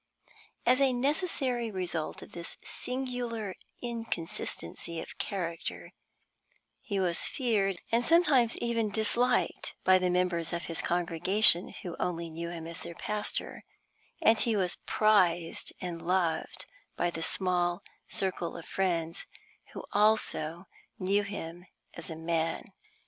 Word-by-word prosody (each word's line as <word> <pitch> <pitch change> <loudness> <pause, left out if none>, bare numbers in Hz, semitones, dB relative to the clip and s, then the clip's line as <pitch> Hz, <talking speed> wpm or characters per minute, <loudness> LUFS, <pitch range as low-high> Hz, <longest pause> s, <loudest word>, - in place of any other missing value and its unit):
As 255 +3 +5
a 270 -2 +5
necessary 265 -3 0
result 180 -5 -3
of - - -13
this 170 -1 -7
singular 245 -5 -3 0.3
inconsistency 185 -7 -4
of - - -9
character, 170 -3 -4 0.9
he 200 -3 -2
was 175 -3 +2
feared, 210 -8 +1
and 230 +1 +3
sometimes 285 -7 +5
even 230 -2 0
disliked, 220 +4 +1
by 185 0 +6
the 185 0 +1
members 180 -2 +1
of 170 - -2
his 165 - -1
congregation 175 +2 +4
who 175 -2 -5
only 170 -2 -2
knew 170 +1 -4
him 170 -2 -6
as 165 +1 -2
their 170 0 -7
pastor, 210 +4 -3 0.6
and 225 0 +6
he 230 -2 +2
was 185 -3 +1
prized 180 -6 +3
and 175 -2 -4
loved 170 -2 0 0.3
by 175 - +1
the 165 - -5
small 175 +1 0 0.2
circle 185 -3 -2
of 170 - -9
friends 170 -3 -1 0.5
who - - -6
also 195 -5 +2 0.3
knew 195 +2 +2
him 175 -3 -6 0.3
as 170 - -6
a 160 - -5
man. 165 +3 -1
185 Hz, 125 wpm, -30 LUFS, 170-220 Hz, 0.9 s, by